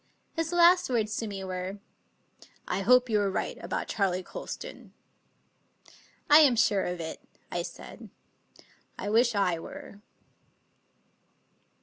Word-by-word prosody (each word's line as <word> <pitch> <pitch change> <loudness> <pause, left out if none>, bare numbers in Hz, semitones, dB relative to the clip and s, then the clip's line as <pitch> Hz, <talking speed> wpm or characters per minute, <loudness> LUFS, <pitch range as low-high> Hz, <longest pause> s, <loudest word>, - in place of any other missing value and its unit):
His 330 0 -2
last 350 -1 +5
words 215 -4 0
to 225 - -3
me 195 -2 -6
were: 185 +1 -5 0.5
" - - -24
I 195 - -1
hope 250 +5 +5
you 215 -3 +2
are 200 - +1
right 190 - -3
about - - -3
Charley 185 -3 0
Colston." - - -8 0.7
" - - -28
I 295 - +8
am 285 -6 +6
sure 205 -3 +2
of 180 0 -4
it," 160 -1 -6 0.3
I - - -1
said. - - -10 0.4
" - - -22 0.3
I 205 - -4
wish 235 +1 +3
I 180 -4 +1
were." 200 +4 -10
210 Hz, 140 wpm, -28 LUFS, 190-250 Hz, 0.7 s, I